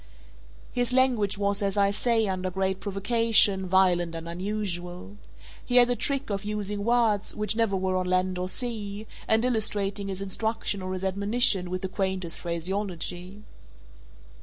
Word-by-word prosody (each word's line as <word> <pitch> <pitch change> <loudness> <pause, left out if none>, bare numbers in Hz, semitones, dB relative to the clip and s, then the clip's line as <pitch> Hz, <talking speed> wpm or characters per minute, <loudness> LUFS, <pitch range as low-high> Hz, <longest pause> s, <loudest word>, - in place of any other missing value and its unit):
His 245 0 -1
language 245 -6 +2
was, 200 +1 0
as 200 0 -1
I 200 0 +3
say, 225 +1 +1
under 185 -1 -2
great 190 +1 -1
provocation, 200 -1 +3
violent 175 -2 +2
and 165 0 -6
unusual. 175 - -4 0.5
He 245 - -3
had 245 0 +7
a - - +1
trick 275 -2 -1
of 195 0 -2
using 205 -1 -3
words 225 -3 +1
which 210 0 0
never 225 -3 +1
were 185 0 -1
on 185 0 -1
land 185 0 0
or 180 0 -2
sea, 215 -3 -3 0.2
and 220 +2 +3
illustrating 205 -4 0
his 190 -1 -4
instruction 200 +1 -1
or 185 0 -4
his 185 0 -5
admonition 200 0 +2
with 185 +1 -4
the - - -1
quaintest 190 -2 -3
phraseology. 180 +2 -3
200 Hz, 155 wpm, -26 LUFS, 185-215 Hz, 0.5 s, had